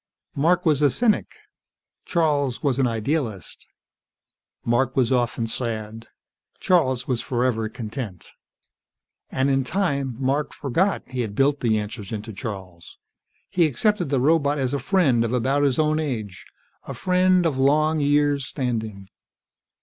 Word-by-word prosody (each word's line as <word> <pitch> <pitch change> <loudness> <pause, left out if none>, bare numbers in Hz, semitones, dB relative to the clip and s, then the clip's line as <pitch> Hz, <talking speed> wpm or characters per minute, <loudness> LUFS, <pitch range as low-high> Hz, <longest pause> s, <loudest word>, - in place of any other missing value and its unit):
Mark 175 +5 +2
was 150 -3 +3
a 145 - +5
cynic, 220 - +1 0.7
Charles 145 -7 0
was 140 -3 +1
an 130 - +3
idealist. 115 - -3 1.0
Mark 120 +2 +1
was 130 -2 +2
often 120 -2 +1
sad; 115 -1 -4 0.5
Charles 130 -9 +2
was 125 -3 0
forever 120 -3 -1
content. 110 -4 -7 1.0
And 130 +1 0
in 135 -1 +2
time, 140 - -1
Mark 140 +3 -1
forgot 170 +9 0
he 130 -1 -3
had 105 -3 -4
built 140 +3 +2
the 110 -3 +1
answers 105 -1 -5
into 110 0 -5
Charles. 95 -6 -8 0.5
He 170 -3 +2
accepted 175 - +1
the 135 -2 +1
robot 145 +1 +2
as 130 -1 -1
a 140 - 0
friend, 145 - +2
of 115 +1 -2
about 130 +3 +1
his 140 -3 +2
own 155 0 +2
age. 110 -11 -4 0.4
A - - -6
friend 185 -1 +3
of 145 -5 0
long 155 +3 +3
years' 145 -1 +2
standing. 110 -7 -4
135 Hz, 140 wpm, -23 LUFS, 115-150 Hz, 1.0 s, a